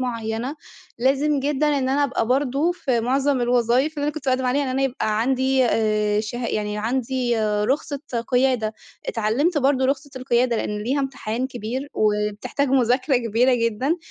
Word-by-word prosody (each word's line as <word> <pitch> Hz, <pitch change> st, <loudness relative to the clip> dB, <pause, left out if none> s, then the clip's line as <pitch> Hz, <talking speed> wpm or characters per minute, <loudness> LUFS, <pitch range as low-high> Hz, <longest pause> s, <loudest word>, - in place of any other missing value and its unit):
معيّنة، 235 Hz, +2 st, -3 dB, 0.4 s
لازم 275 Hz, +3 st, +2 dB
جدًا 290 Hz, +2 st, 0 dB
إن 280 Hz, -3 st, +1 dB
أنا 285 Hz, +2 st, +2 dB
أبقى 265 Hz, -4 st, -1 dB
برضو 275 Hz, +6 st, +1 dB
في 255 Hz, -8 st, -1 dB
معظم 265 Hz, +3 st, +1 dB
الوظايف 245 Hz, +4 st, +2 dB
اللي 290 Hz, -, -2 dB
أنا 295 Hz, -, 0 dB
كنت 310 Hz, -3 st, -7 dB
بأقدم 255 Hz, 0 st, +1 dB
عليها، 275 Hz, +3 st, +1 dB
إن 270 Hz, -, -2 dB
أنا 265 Hz, +1 st, 0 dB
يبقى 220 Hz, -5 st, 0 dB
عندي 260 Hz, +1 st, +2 dB
آآ 215 Hz, -2 st, +1 dB
شه 235 Hz, +3 st, -4 dB
يعني 210 Hz, -1 st, -2 dB
عندي 245 Hz, +1 st, -1 dB
رخصة 215 Hz, +7 st, 0 dB, 0.3 s
قيادة. 245 Hz, -4 st, +1 dB, 0.3 s
اتعلمت 245 Hz, +10 st, +1 dB
برضو 265 Hz, -1 st, +2 dB
رخصة 280 Hz, +1 st, -1 dB
القيادة، 245 Hz, -2 st, +1 dB
لأن 210 Hz, -1 st, -2 dB
ليها 265 Hz, +6 st, 0 dB
امتحان 255 Hz, -3 st, -3 dB
كبير 250 Hz, +3 st, -5 dB
وبتحتاج 210 Hz, +6 st, 0 dB
مذاكرة 255 Hz, +1 st, +2 dB
كبيرة 240 Hz, +2 st, +2 dB
جدًا، 235 Hz, +7 st, 0 dB
255 Hz, 155 wpm, -22 LUFS, 230-275 Hz, 0.4 s, لازم